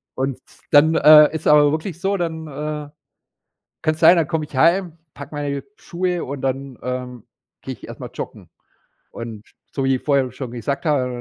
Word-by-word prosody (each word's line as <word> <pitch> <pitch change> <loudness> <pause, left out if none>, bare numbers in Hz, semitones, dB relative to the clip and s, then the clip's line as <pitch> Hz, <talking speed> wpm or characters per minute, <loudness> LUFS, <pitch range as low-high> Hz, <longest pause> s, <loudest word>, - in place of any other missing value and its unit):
Und 130 -1 -2 0.3
dann, 155 +3 +5
äh, 150 +1 +7
ist 160 - -3
es - - -2
aber 150 -1 +6
wirklich 160 +2 -4
so, 195 +1 0
dann, 160 -2 -3
äh, 150 0 -5 0.9
kann's 155 0 0
sein, 170 +2 +7
dann 160 - +1
komme 160 -1 -2
ich 145 - -13
heim, 170 +3 +2 0.2
packe 140 +2 -10
meine 145 -1 -3
Schuhe 180 0 -3
und 140 0 -6
dann, 135 -1 -3
ähm, 125 -2 -5 0.4
gehe - - -6
ich - - -13
erst - - -10
mal - - -8
joggen. - - -8 0.6
Und 115 -2 -8 0.3
so 135 - -2
wie 135 - +3
ich 130 - -6
vorher 135 -4 +1
schon 130 -1 -7
gesagt 125 +7 -4
habe, 130 -5 +1
145 Hz, 185 wpm, -21 LUFS, 130-160 Hz, 0.9 s, äh